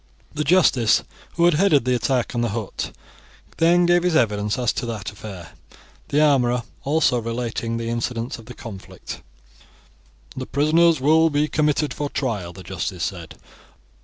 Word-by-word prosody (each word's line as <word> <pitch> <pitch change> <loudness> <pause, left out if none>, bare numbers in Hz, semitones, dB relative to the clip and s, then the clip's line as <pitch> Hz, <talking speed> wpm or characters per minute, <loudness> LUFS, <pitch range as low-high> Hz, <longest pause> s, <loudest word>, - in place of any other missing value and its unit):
The 150 - -1
justice 150 -9 +4 0.3
who 170 - +3
had 175 - +5
headed 155 -5 +3
the 125 - +2
attack 125 +1 0
on 120 - -1
the 120 - 0
hut 105 -1 -4 0.7
then 175 +2 +4
gave 175 0 +4
his 180 -2 +1
evidence 105 -5 +1
as 125 -3 +1
to 120 - -4
that 110 -2 -5
affair, 100 -4 -10 0.6
the 145 - +1
armourer 125 -5 +3 0.2
also 145 -4 +2
relating 115 0 -3
the 115 0 -4
incidents 115 0 -3
of 115 - -14
the 125 - -9
conflict. 100 -5 -9 1.1
"The - - -5
prisoners 160 +2 +3
will 160 +4 +4
be 145 0 +1
committed 150 -1 0
for 145 -1 -3
trial," 105 -13 -3
the - - -12
justice - - -4
said. - - -5
125 Hz, 160 wpm, -22 LUFS, 115-155 Hz, 1.1 s, had